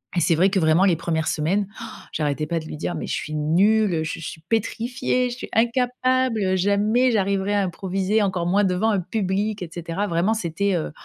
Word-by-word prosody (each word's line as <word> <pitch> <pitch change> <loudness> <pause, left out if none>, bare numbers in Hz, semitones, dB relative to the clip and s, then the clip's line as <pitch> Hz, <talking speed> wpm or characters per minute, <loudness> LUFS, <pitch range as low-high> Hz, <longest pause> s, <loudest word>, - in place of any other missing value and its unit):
Et - - +2
c'est 165 0 +3
vrai 185 +5 +4
que 195 - +2
vraiment 160 +3 +4
les 185 -4 +4
1res 160 -1 -2
semaines, 185 +6 0
han - - -5 0.3
j'arrêtais 150 0 -1
pas 165 +2 -1
de 160 - -9
lui 155 - -7
dire: 170 - -3
«Mais - - -5
je - - -3
suis 155 - -4
nulle, 175 +3 +2
je 165 - -4
suis 160 0 -7
pétrifiée, 245 +3 -1
je 240 - -5
suis - - -7
incapable, 245 -3 +1
jamais 210 +6 +2
j'arriverai 200 -1 0
à 205 - +2
improviser 190 +3 -1
encore 185 -4 0
moins 195 +4 +2
devant 190 +3 +1
un 200 - +1
public, 200 +2 -2
et 170 - -7
cetera». 175 +4 -3
Vraiment, 175 +4 +1
c'était, 200 -1 -1
heu, 165 - -1
han - - -9
195 Hz, 210 wpm, -23 LUFS, 170-220 Hz, 0.3 s, vrai